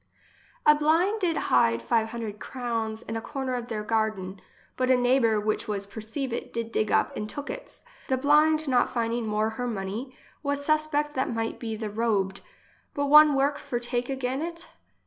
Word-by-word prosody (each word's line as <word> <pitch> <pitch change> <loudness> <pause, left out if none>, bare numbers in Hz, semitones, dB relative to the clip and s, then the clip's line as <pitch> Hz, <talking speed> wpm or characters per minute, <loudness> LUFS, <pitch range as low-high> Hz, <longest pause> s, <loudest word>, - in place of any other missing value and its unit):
A 300 - +8
blind 330 +8 +2
did 335 -4 +1
hide 115 -2 +3
five 220 - +1
hundred 220 -3 -5
crowns 230 -3 -3
in 225 - -5
a 225 - -2
corner 265 0 -4
of 240 -1 -3
their 215 -3 -3
garden; 210 -4 -1 0.3
but 255 0 0
a 255 - +5
neighbour, 245 -3 +3
which 215 +1 -1
was 200 -2 -2
perceive 225 +5 -5
it, - - -4
did 230 -1 -4
dig 215 -2 0
up - - +2
and 210 - -4
took 290 +4 -5
its. - - -10 0.2
The 260 - +1
blind 305 +3 +4
not 250 -2 +3
finding 230 -1 -1
more 215 +1 0
her 245 +2 -3
money, 220 +4 -4 0.2
was 285 -1 -2
suspect 305 -1 +1
that 260 -1 -1
might 225 -1 -3
be 225 -2 -4
the 215 -1 -5
robed, 205 -3 0 0.5
but 285 0 0
one 300 -1 +8
work 280 +1 +1
for 240 - -3
take 240 +1 -2
again 265 0 -2
it? 335 +1 -6
240 Hz, 185 wpm, -27 LUFS, 220-285 Hz, 0.5 s, A